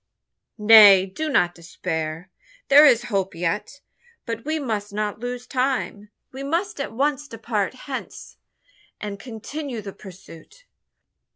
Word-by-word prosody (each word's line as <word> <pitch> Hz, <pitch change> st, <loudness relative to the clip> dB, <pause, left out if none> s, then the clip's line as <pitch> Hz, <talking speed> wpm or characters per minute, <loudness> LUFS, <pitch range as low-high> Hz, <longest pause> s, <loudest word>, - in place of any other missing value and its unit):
"Nay 210 Hz, -3 st, +8 dB
do 305 Hz, +12 st, -5 dB
not 175 Hz, -10 st, +2 dB
despair! 165 Hz, 0 st, -5 dB, 0.4 s
there 290 Hz, +2 st, +8 dB
is 240 Hz, -4 st, +4 dB
hope 190 Hz, -2 st, -1 dB
yet. 205 Hz, +11 st, -3 dB, 0.4 s
But 230 Hz, 0 st, -5 dB
we 310 Hz, +1 st, -1 dB
must 215 Hz, -8 st, -3 dB
not 210 Hz, 0 st, -3 dB
lose 245 Hz, +1 st, -5 dB
time. 255 Hz, -5 st, -2 dB, 0.2 s
We 265 Hz, -, -8 dB
must 335 Hz, +7 st, -2 dB
at -, -, -4 dB
once 285 Hz, +4 st, -1 dB
depart 225 Hz, -3 st, -3 dB
hence, 270 Hz, -2 st, -8 dB, 0.6 s
and 205 Hz, -1 st, -6 dB
continue 250 Hz, +3 st, -7 dB
the 200 Hz, -2 st, -8 dB
pursuit." 190 Hz, -, -14 dB
225 Hz, 125 wpm, -23 LUFS, 195-275 Hz, 0.6 s, Nay